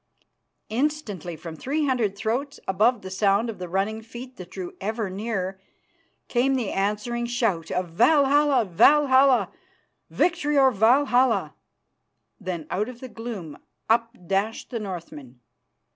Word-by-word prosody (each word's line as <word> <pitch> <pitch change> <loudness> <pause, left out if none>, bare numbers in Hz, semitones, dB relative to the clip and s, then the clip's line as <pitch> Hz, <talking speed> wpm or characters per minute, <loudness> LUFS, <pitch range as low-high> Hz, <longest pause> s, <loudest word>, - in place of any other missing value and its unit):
_" - - -37 0.5
Instantly 225 - -2
from 160 +1 -8
three 290 - -1
hundred 240 -7 0
throats, 245 +7 -2
above 210 +4 +2
the 190 - -7
sound 200 +4 +2
of 210 - -13
the 180 -1 -6
running 200 +5 -1
feet 245 +3 -10
that 180 -1 -9
drew 185 -2 -7
ever 215 0 -2
nearer, 195 -2 -3 0.7
came 265 +2 +2
the 240 -6 -1
answering 210 +4 -1
shout 230 -9 -1
of 180 -1 -2
"Valhalla, 285 - +4
Valhalla! 265 - +4 0.6
Victory 310 -4 +1
or 265 -1 +6
Valhalla!" 250 +3 +3 0.9
Then 180 -6 -5
out 210 +5 -1
of 245 -2 -10
the 260 - -8
gloom 220 -10 -7 0.3
up 230 +1 +3 0.2
dashed 200 +8 -2
the 235 - -2
Northmen. 165 - -8
225 Hz, 135 wpm, -25 LUFS, 190-255 Hz, 0.9 s, or